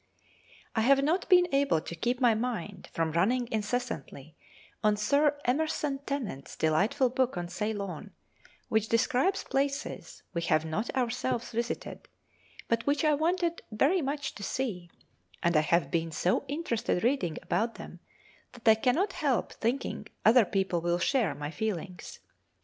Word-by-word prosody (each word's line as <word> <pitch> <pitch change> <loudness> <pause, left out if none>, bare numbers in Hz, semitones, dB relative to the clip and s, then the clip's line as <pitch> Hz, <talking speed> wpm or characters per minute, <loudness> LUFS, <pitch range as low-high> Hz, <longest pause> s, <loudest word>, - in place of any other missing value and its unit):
I 220 - +2
have 275 +4 +4
not 335 +8 0
been 360 -2 +6
able 275 - +3
to 165 - -7
keep 245 +8 -1
my 245 -3 +5
mind 215 -5 -4
from 165 -1 -1
running 230 +10 +1
incessantly 205 - -3 0.5
on 210 -1 +3
Sir 285 +7 +2
Emerson 285 +1 0
Tennent's 230 - -4
delightful 195 - +2
book 255 -5 0
on 175 0 -3
Ceylon, 200 -2 -4 0.6
which 220 0 +1
describes 260 - +2
places 280 +2 -3
we 170 - -1
have 160 -2 +2
not 160 +9 -2
ourselves 250 -1 -1
visited, 235 +1 -4 0.6
but 230 +2 0
which 285 +2 +2
I 305 - +4
wanted 340 +3 0
very 285 - +2
much 280 0 -3
to - - -11
see, 195 -6 -3 0.5
and 170 0 +2
I 155 - +6
have 155 -2 +1
been 165 -1 0
so 180 - 0
interested 265 - -1
reading 225 - +1
about 225 +6 0
them - - -10 0.5
that 240 -1 -10
I 220 - +10
cannot 340 +11 +2
help 280 -6 0
thinking 235 -2 -2 0.2
other 225 +1 +7
people 190 -3 0
will 175 +1 +1
share 210 - +1
my 145 +1 -5
feelings. 185 -3 -5
230 Hz, 150 wpm, -29 LUFS, 180-275 Hz, 0.6 s, I